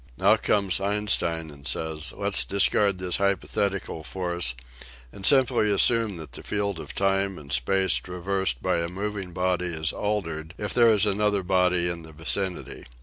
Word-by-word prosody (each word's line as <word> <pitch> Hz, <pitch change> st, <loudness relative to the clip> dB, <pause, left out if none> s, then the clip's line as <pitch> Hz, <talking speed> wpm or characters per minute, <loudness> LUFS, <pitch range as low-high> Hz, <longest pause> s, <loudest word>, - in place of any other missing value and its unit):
Now -, -, +5 dB
comes 100 Hz, -2 st, +1 dB
Einstein 95 Hz, -6 st, -1 dB
and 70 Hz, -1 st, -10 dB
says: 80 Hz, -1 st, -1 dB
*' -, -, -17 dB
Let's 100 Hz, 0 st, +4 dB
discard 100 Hz, 0 st, +2 dB
this 90 Hz, -1 st, -1 dB
hypothetical 100 Hz, -2 st, -1 dB
force 85 Hz, -7 st, -2 dB, 0.6 s
and 95 Hz, -, -2 dB
simply 130 Hz, -6 st, +4 dB
assume 105 Hz, 0 st, +2 dB
that 80 Hz, -5 st, -9 dB
the -, -, -9 dB
field 100 Hz, -3 st, -2 dB
of 70 Hz, -, -9 dB
time 95 Hz, -1 st, 0 dB
and 70 Hz, -1 st, -7 dB
space 95 Hz, +10 st, +2 dB
traversed 90 Hz, -6 st, -3 dB
by 90 Hz, -2 st, +1 dB
a 85 Hz, -, -2 dB
moving 100 Hz, 0 st, -5 dB
body 90 Hz, 0 st, -1 dB
is 80 Hz, -2 st, -2 dB
altered 85 Hz, -6 st, -3 dB
if 105 Hz, -, -3 dB
there 120 Hz, -1 st, +5 dB
ia 105 Hz, -2 st, +2 dB
an 100 Hz, +2 st, -3 dB
other 105 Hz, -2 st, +1 dB
body 90 Hz, -1 st, +2 dB
in 85 Hz, -1 st, -3 dB
the 80 Hz, -1 st, -13 dB
vicinity." 90 Hz, +4 st, -2 dB
95 Hz, 170 wpm, -25 LUFS, 85-100 Hz, 0.6 s, Now